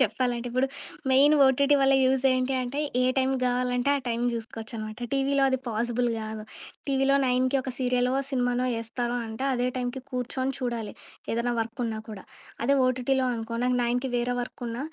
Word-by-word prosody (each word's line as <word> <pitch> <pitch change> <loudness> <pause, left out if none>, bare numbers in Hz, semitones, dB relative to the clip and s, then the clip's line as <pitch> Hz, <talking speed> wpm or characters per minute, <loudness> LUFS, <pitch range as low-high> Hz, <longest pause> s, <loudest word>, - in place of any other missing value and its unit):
చెప్పాలంటే 245 -2 0
ఇప్పుడు. 255 +2 +1 0.4
Main 285 +3 +6
OTT 280 +2 +4
వల్ల 270 0 +5
యూజ్ 260 0 +2
ఏంటి 255 +1 0
అంటే 255 +4 -3 0.2
ఏ - - +3 0.2
టైమ్ 265 0 +2
గావాలంటే 250 +1 +1
ఆ - - -1
టైమ్ 235 +1 -1
జూసుకోవచ్చనమాట. 220 -1 -6
టీవీలో 275 0 +2
అది 260 -1 +1
పాజిబుల్ 235 +2 0
గాదు. 215 -1 -6 0.4
టీవీలో 270 0 +3
9కి 255 +2 +2
ఒక 260 - -4
సీరియల్ 250 -1 +1 0.2
సినిమానో 250 -1 +1
ఏస్తారో 240 +1 -3
అంటే 220 +4 -5
అదే 245 -1 0
టైమ్‌కి 250 +1 -3
కూర్చొని 260 +1 -2
చూడాలి 235 -4 -3 0.4
ఏదైనా 235 +1 0
వర్క్ 225 +2 -5
ఉన్నా 220 -1 -3
కూడా. 205 -3 -8 0.4
అదే 280 +4 +4
ఓటీటీలో 255 +1 +1
అనుకో 230 0 -4
నాకు 250 0 +2
9కి 245 +2 0
వేరే 245 +1 0
వర్క్ 245 +1 -7
ఉన్న 230 +1 -5
250 Hz, 165 wpm, -27 LUFS, 235-265 Hz, 0.4 s, Main